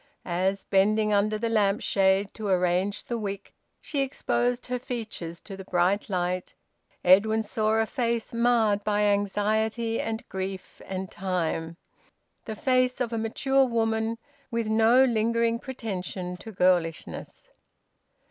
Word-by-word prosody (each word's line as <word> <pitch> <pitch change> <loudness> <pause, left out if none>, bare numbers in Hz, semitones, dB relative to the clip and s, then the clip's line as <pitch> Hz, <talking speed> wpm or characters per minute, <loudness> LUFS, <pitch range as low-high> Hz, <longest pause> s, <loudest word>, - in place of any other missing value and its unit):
As, 190 +3 0
bending 210 +2 +2
under 210 +1 +2
the 230 +2 -1
lamp 210 -3 +2
shade 195 0 +2
to 215 -2 -5
arrange 185 +2 +1
the 235 -1 -3
wick, 200 -2 -5 0.3
she 290 - -4
exposed 245 -2 0
her 250 0 -2
features 220 -9 -5
to 195 - -8
the 190 - -8
bright 185 +4 +1
light, 180 -1 -2 0.5
Edwin 215 +5 +5
saw 215 +1 0
a 225 - +3
face 235 -2 -2
marred 230 -3 +2
by 210 -1 +1
anxiety 215 +3 +1
and 225 0 -4
grief 190 0 -6
and 190 -1 -4
time, 170 -3 -2 0.7
the 220 - -5
face 255 +1 +1
of 240 -2 -1
a - - -1
mature 265 +5 +2
woman, 225 -1 0 0.3
with 230 -2 -1
no 225 +4 +5
lingering 230 0 +1
pretension 190 -8 -5
to 220 - -9
girlishness. 180 - -1
215 Hz, 135 wpm, -27 LUFS, 190-230 Hz, 0.7 s, Edwin